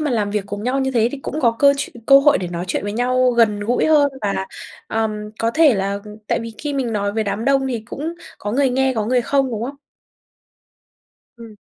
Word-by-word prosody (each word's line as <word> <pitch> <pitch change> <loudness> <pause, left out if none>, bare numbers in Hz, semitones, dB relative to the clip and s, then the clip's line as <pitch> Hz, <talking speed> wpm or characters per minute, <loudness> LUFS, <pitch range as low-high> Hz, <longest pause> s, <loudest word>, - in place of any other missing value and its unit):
mà 305 -3 -1
làm 210 -4 0
việc 205 -1 -2
cùng 205 +1 -6
nhau 260 +3 0
như 265 0 0
thế 235 -2 +2
thì 285 - -5
cũng 310 - -4
có 235 -3 +3
cơ 280 0 +6
chuyện 275 - -5
cơ 275 0 +8
hội 290 +1 +4
để 180 -2 -4
nói 175 0 -4
chuyện - - -1
với 205 0 -3
nhau 250 +2 +2
gần 225 -4 +2
gũi 240 +8 +1
hơn, 295 -2 +5
và, 195 -2 -2 0.4
ờm, 215 -1 -2
có 230 - +1
thể 305 -2 +4
là 200 +1 -1 0.3
tại - - +1
vì 230 -1 -7
khi 295 -1 -3
mình 255 -5 -2
nói 200 -1 -1
với 220 0 -1
đám 205 +3 -3
đông 270 -1 +2
thì 235 -3 -2
cũng 320 +4 -5 0.2
có 205 +1 -4
người 270 0 +2
nghe 265 +1 +1
có 215 -2 -1
người 250 0 +2
không, 270 0 +1
đúng 225 -1 -4
không? 275 +3 -5 1.6
Ừm. 230 -2 -12
235 Hz, 235 wpm, -20 LUFS, 210-270 Hz, 1.6 s, cơ